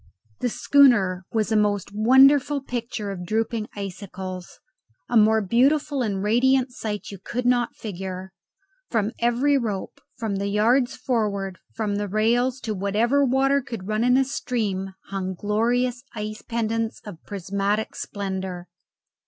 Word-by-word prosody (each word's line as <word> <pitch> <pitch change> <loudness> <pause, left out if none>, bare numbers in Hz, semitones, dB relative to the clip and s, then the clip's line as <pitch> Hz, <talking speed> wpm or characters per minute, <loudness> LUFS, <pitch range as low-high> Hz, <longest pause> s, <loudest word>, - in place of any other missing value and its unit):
The 245 - 0
schooner 210 -10 +4
was 220 -1 0
a - - +3
most 205 -2 +1
wonderful 265 +6 +5
picture 235 -5 -4
of 180 -2 -6
drooping 220 +3 -1
icicles. 190 -2 -7 0.5
A 245 - -2
more 220 0 +5
beautiful 275 +6 +2
and 200 -5 -1
radiant 255 +4 +3
sight 210 -4 -5
you 200 - -9
could 245 +1 -3
not 245 -1 +2
figure. 190 -2 -6 0.6
From 220 -2 0
every 250 +4 +2
rope, 210 -6 -4 0.2
from 220 -5 -2
the 200 +1 -2
yards 235 +5 +2
forward, 205 -7 -2 0.2
from 210 -3 -1
the 205 0 -2
rails, 240 +5 +1
from 215 -4 -3
whatever 225 +8 +2
water 270 +2 +3
could 230 -7 -7
run 215 +1 0
in 250 +1 +4
a 270 - +3
stream, 200 -8 -2
hung 190 -1 -3
glorious 240 +5 0
ice 215 0 -5
pendants 225 -1 -2
of 190 -6 -9
prismatic 200 +2 -2
splendour. 190 -3 -4
220 Hz, 140 wpm, -24 LUFS, 200-245 Hz, 0.6 s, wonderful